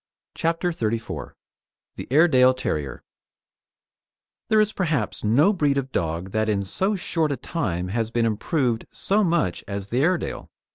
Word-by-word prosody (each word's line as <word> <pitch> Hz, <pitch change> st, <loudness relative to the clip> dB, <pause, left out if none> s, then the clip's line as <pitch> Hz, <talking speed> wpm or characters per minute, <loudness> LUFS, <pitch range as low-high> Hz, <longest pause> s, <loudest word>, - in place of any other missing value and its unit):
CHAPTER 165 Hz, +2 st, 0 dB
XXXIV 115 Hz, -6 st, -3 dB, 0.6 s
THE -, -, -7 dB
AIREDALE 130 Hz, -3 st, +5 dB
TERRIER 75 Hz, -, -3 dB, 1.5 s
There 220 Hz, -, +4 dB
is 215 Hz, 0 st, +2 dB
perhaps 155 Hz, -, -1 dB
no 140 Hz, -, +4 dB
breed 145 Hz, -7 st, +1 dB
of 135 Hz, -1 st, -2 dB
dog 85 Hz, +3 st, -2 dB
that 110 Hz, +1 st, 0 dB
in 100 Hz, -2 st, +1 dB
so 190 Hz, -, -1 dB
short 165 Hz, -4 st, -1 dB
a 140 Hz, -, -1 dB
time 90 Hz, -, -3 dB
has 110 Hz, +2 st, -1 dB
been 115 Hz, 0 st, +1 dB
improved 115 Hz, +2 st, 0 dB
so 210 Hz, +2 st, +1 dB
much 165 Hz, -, 0 dB
as 100 Hz, 0 st, -5 dB
the 125 Hz, +3 st, +1 dB
Airedale. 175 Hz, +3 st, -1 dB
130 Hz, 145 wpm, -24 LUFS, 105-165 Hz, 1.5 s, AIREDALE